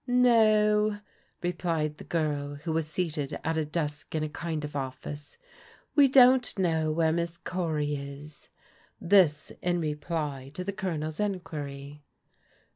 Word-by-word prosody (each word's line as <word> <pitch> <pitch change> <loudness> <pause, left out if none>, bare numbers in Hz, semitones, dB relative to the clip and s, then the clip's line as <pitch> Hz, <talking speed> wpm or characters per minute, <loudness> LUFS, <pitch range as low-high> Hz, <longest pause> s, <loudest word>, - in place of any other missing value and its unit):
*' - - -43 0.3
No," 210 -1 +4 0.5
replied 165 -3 -1
the - - -8
girl 145 -3 -1
who 160 +3 -4
was 160 -1 0
seated 155 -3 -2
at 160 +1 0
a 160 - +1
desk 150 -1 -4
in 155 - 0
a 155 - -3
land 160 -3 -2
of 150 - -8
office, 140 +2 -6 0.6
"we 285 -2 +7
don't 255 -2 +5
know 160 -4 +1
where 160 0 +2
Miss 170 +1 -2
Cory 160 -6 -2
is^^ 140 +1 -7 0.5
This 170 -5 +3
in 175 0 +1
repiy 150 -3 -3
to 180 - -4
the 200 +2 -3
Colonel's 160 -6 -3
enquiry. 150 -8 -4
160 Hz, 140 wpm, -28 LUFS, 150-180 Hz, 0.6 s, we